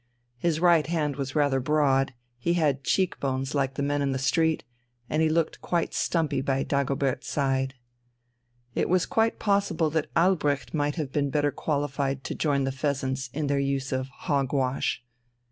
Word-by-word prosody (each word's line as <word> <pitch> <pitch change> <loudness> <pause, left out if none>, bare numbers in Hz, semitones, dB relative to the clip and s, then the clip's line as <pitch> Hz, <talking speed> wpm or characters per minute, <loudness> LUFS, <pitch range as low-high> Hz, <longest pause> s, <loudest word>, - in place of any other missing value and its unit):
His 160 +2 +1
right 170 -4 +4
hand 155 -4 0
was 135 -1 -4
rather 145 -3 +3
broad, 135 -2 +2 0.2
he 170 +8 +1
had 145 -5 +1
cheek 185 +4 +1
bones 135 0 -2
like 135 -2 0
the 140 - -2
men 145 0 0
in 140 -1 0
the - - -1
street, 160 +5 +1 0.4
and 155 +4 0
he 160 - +3
looked 165 0 0
quite 170 -2 -1
stumpy 155 -5 0
by 135 0 0
Dagobert's 140 -1 -1
side. 135 -1 0 1.0
It - - 0
was 185 0 +3
quite 225 0 +1
possible 200 -6 +1
that 155 -1 -1
Albrecht 160 -6 +2
might 145 -2 0
have 150 -5 -3
been 145 0 0
better 145 0 +1
qualified 140 -2 -2
to - - -4
join 140 -3 +1
the 135 - 0
"Pheasants" 135 -1 -2
in 150 +3 -2
their 140 0 +1
use 140 -1 -1
of 130 0 -1
"hog 135 -1 -2
wash." 130 -2 0
140 Hz, 175 wpm, -27 LUFS, 135-155 Hz, 1.0 s, right